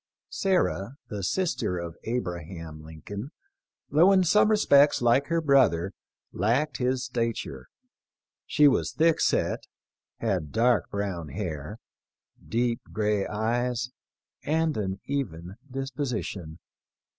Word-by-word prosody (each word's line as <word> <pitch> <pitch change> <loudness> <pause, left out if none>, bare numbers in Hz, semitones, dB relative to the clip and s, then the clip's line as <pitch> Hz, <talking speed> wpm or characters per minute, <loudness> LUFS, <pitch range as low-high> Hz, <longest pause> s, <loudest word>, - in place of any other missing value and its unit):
Sarah, 140 - 0
the 105 -1 -4
sister 130 - -1
of 85 -1 -5
Abraham 85 -8 -4
Lincoln, 90 - -8 0.6
though 165 +7 +6
in 190 -1 +5
some 210 +5 +4
respects 145 -9 +5
like 120 +4 +3
her 165 0 +1
brother, 120 - +3 0.4
lacked 125 +5 +1
his 130 0 0
stature. 115 - -3 0.8
She 150 - +5
was 135 - +2
thick 165 0 +3
set, - - +1 0.5
had 75 - -1
dark 120 0 +2
brown 95 -5 -3
hair, 85 +2 -5 0.7
deep 120 0 0
gray 105 -2 0
eyes, 120 +3 -1 0.5
and 160 0 +1
an 95 -2 -2
even 95 -10 -4
disposition. 125 - -4
115 Hz, 110 wpm, -27 LUFS, 95-140 Hz, 0.8 s, though